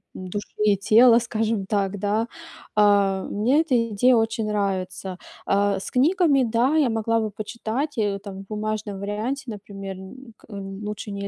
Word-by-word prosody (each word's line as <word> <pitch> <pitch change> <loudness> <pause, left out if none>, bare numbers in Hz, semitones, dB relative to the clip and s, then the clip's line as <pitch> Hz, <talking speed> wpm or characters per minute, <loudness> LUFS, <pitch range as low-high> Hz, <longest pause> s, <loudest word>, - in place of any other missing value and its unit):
души 185 +3 -5 0.2
и 205 -1 +4
тела, 230 +4 +6
скажем 225 -3 -1
так, 200 -1 0
да. 210 +3 0 0.5
Э, 200 -2 +4
мне 250 +9 +2
эта 245 -7 +1
идея 245 +5 +4
очень 225 -1 0
нравится. 190 -2 -2 0.3
Э, 200 0 +2
с - - -6
книгами, 290 0 +3
да, 240 +5 +2
я 300 -5 +3
могла 225 0 +1
бы 215 -2 -2
почитать, 235 +7 -4
э, 205 -2 0
там 195 -1 -9
в - - -36
бумажном 215 -1 -3
варианте, 215 +8 -3
например, 195 -2 -8
н 230 +6 -12
к - - -20
лучше 205 +1 -6
не 200 0 -4
210 Hz, 160 wpm, -24 LUFS, 200-230 Hz, 0.5 s, тела